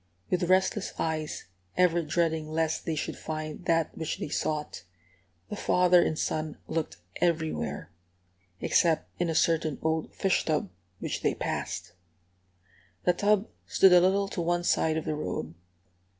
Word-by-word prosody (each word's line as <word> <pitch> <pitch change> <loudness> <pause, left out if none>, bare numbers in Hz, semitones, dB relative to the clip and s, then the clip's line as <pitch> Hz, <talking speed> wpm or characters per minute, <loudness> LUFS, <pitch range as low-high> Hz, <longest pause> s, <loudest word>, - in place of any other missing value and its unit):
With 180 -1 +1
restless 190 +2 +2
eyes, 155 -1 -2 0.3
ever 175 -2 +4
dreading 160 -1 0
lest 160 0 -1
they 160 - -1
should 150 - -3
find 155 +2 -5
that 165 -1 +1
which 160 - -3
they - - -4
sought, 150 - -2 0.7
the - - -4
father 180 -3 +4
and 155 - -1
son 155 -1 -2
looked 165 -2 -2 0.2
everywhere, 160 -2 -1 0.7
except 165 -3 +2
in 175 - +1
a 165 - -1
certain 160 -3 +2
old 160 0 0
fish 190 -2 +2
tub 150 - -1 0.3
which - - -4
they - - +1
passed. 85 - -4 1.1
The 180 - +4
tub 205 +3 +2 0.2
stood 190 -2 +6
a 180 - +8
little 195 +2 +3
to 175 - -3
one 175 +1 0
side 160 -2 +2
of 160 - -3
the - - -1
road. 90 - -4
165 Hz, 150 wpm, -28 LUFS, 155-180 Hz, 1.1 s, a